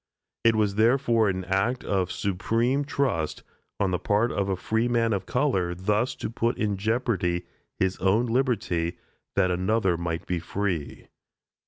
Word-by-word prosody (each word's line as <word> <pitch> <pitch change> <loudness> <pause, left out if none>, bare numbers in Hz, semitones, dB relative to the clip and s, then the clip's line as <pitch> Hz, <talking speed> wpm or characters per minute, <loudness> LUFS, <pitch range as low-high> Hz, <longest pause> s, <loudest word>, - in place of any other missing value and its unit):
It 115 -1 +5
was 105 -2 +2
therefore 115 -2 +3
an 95 -1 -2
act 95 +7 0
of 95 -2 0
supreme 115 +9 0
trust 130 - -1 0.4
on 95 -2 +1
the 90 - 0
part 105 +5 +1
of 100 -1 -1
a 95 - +1
freeman 115 +4 +1
of 100 - -3
color 95 -10 +1
thus 105 +6 0
to - - -4
put 115 +1 0
in 105 -2 0
jeopardy 100 -5 0 0.3
his 95 0 0
own 100 +6 +2
liberty 115 -9 0 0.4
that 95 -2 +3
another 95 0 +1
might 85 0 -3
be 90 -1 -1
free. 90 -3 -3
100 Hz, 150 wpm, -26 LUFS, 90-115 Hz, 0.4 s, It